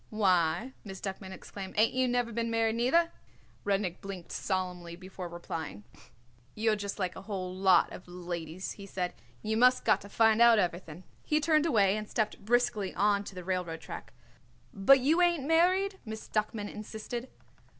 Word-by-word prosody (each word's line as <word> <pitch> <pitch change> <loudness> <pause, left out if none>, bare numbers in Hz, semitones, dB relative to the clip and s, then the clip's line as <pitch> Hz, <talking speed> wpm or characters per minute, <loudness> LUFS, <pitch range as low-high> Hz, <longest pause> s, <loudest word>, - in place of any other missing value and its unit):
"Why," 190 +2 +2
Miss 195 -2 -8
Duckman 190 -1 -6
exclaimed, 190 0 -8
"ain't 220 +1 +4
you 255 0 +2
never 245 -1 0
been 230 +1 -1
married, 225 -1 +1
neither?" 305 +9 +3 0.5
Rudnik 195 -3 -1
blinked 195 -3 -8
solemnly 180 -3 -3
before 185 0 -8
replying. 165 -9 -6 0.7
"You're 220 0 +2
just 205 -1 -5
like 185 -3 -2
a - - -8
whole 190 -3 -4
lot 190 -1 +4
of 180 - -10
ladies," 175 0 -5
he 200 -1 -9
said; 180 -2 -3 0.3
"you 220 +1 0
must 250 +2 +4
got - - +4
to 200 - -11
find 225 +1 +4
out 235 -1 +8
everything." 175 -3 -2 0.2
He 305 - +1
turned 310 +1 +3
away 205 -8 +3
and 215 0 -5
stepped 215 -2 -2
briskly 220 -3 +1
on 205 0 +2
to 195 - -9
the 180 - -6
railroad 175 -3 -2
track. 115 - -8 0.6
"But 200 +8 +6
ain't 260 - -4
you 345 +2 +4
married?" 365 +6 +2
Miss 220 -1 -7
Duckman 215 -1 -1
insisted. 220 +4 -6
205 Hz, 170 wpm, -30 LUFS, 185-235 Hz, 0.7 s, out